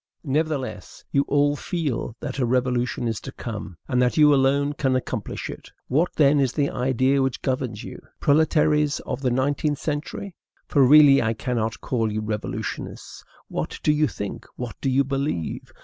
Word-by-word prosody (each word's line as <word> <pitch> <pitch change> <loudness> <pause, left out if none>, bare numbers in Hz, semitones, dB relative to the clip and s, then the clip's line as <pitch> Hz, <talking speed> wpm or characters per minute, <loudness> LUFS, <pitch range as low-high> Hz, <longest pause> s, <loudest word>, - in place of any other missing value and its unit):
Nevertheless, 150 -2 -3
you 140 - +3
all 145 0 +2
feel 145 - -3
that 140 -2 -4
a 125 - +2
revolution 125 -1 0
is 115 -2 -2
to - - -7
come, 105 -6 -7
and 125 0 +1
that 125 +3 +1
you 150 -1 +7
alone 140 +1 +2
can 135 -3 0
accomplish 130 - -3
it. - - -9 0.2
What, 155 +7 +2
then, 145 -1 +4
is 130 -3 +1
the 145 -2 0
idea 130 +2 +1
which 135 -1 -1
governs 130 -5 -2
you, - - -9 0.2
proletaires 150 0 +3
of - - -5
the 130 - +1
nineteenth 145 +4 0
century? 155 +7 -4 0.3
for 140 - +4
really 140 +1 +7
I 115 -1 0
cannot 115 -3 -2
call 115 -4 -1
you 110 +1 -2
revolutionists. 105 -1 -5 0.2
What - - -4
do 150 - +4
you 150 0 +2
think? 100 -6 -6
what 125 -2 -5
do 135 - 0
you 135 +2 +3
believe? 135 - -3
135 Hz, 170 wpm, -24 LUFS, 125-145 Hz, 0.3 s, you